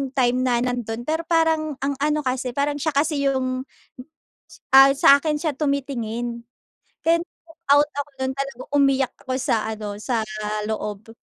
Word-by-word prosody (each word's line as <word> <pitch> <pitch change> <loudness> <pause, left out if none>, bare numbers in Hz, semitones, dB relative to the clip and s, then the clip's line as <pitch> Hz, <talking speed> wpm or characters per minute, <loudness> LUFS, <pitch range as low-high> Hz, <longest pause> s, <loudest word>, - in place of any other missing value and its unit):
time 250 -1 +2
na 240 -2 +2
nandun, 240 -2 -3
pero 320 +2 -1
parang 320 -3 +1
ang 280 0 0
ano 300 0 +1
kasi 255 -1 -1
parang 285 +1 0
siya 310 +2 0
kasi 285 -1 +1
yung 255 -1 -1 1.1
ah 270 0 +9
sa 280 0 +7
akin 305 -1 0
siya 315 -3 -1
tumitingin. 240 -5 -2 0.6
Kaya 335 +1 +3
nag-walkout 325 -4 0
ako 285 0 -3
dun 265 0 -1
talaga 275 -2 -5
umiyak 275 -2 +2
ako 255 - -1
sa 250 - +1 0.2
ano, 210 -1 -5
sa 235 0 -1 0.5
loob. 215 0 -5
275 Hz, 150 wpm, -23 LUFS, 245-295 Hz, 1.1 s, ah